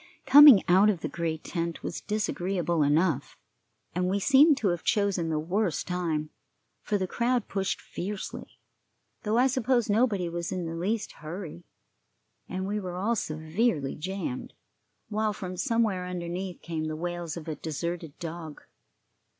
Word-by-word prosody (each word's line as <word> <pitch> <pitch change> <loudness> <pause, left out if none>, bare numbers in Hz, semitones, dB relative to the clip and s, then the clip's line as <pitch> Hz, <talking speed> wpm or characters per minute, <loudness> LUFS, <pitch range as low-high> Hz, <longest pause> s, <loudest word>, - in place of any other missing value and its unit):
Coming 285 -6 +10
out 190 +4 +6
of 190 -6 0
the - - -2
great 160 -2 -3
tent 170 -1 -3
was - - -4
disagreeable 180 -5 -1
enough, 145 0 +1 0.6
and 180 +1 0
we 200 +2 +1
seemed 285 - +6
to 215 -7 +1
have 175 -1 -1
chosen 200 -5 +1
the 155 - 0
worst 175 +3 -1
time, 165 -4 -2 0.5
for 210 - 0
the 190 - -1
crowd 240 +4 0
pushed 195 -1 -2
fiercely, 200 +2 -6 0.6
though 215 +2 0
I 250 - +5
suppose 255 -3 +1
nobody 205 -5 +2
was 170 0 -4
in 180 -2 -2
the 165 - -4
least 200 +6 -2
hurry, 160 - -8 0.8
and 185 0 -3
we 205 +2 -1
were 180 -3 -5
all 210 +6 0
severely 160 - -1
jammed, 175 -5 -5 0.6
while 215 0 0
from 185 -2 -6
somewhere 210 -3 0
underneath 180 0 -5
came 160 -1 -3
the 155 0 -3
wails 175 0 -4
of 165 -1 -8
a 160 - -2
deserted 165 0 -5
dog. 165 -2 -7
180 Hz, 150 wpm, -28 LUFS, 165-210 Hz, 0.8 s, Coming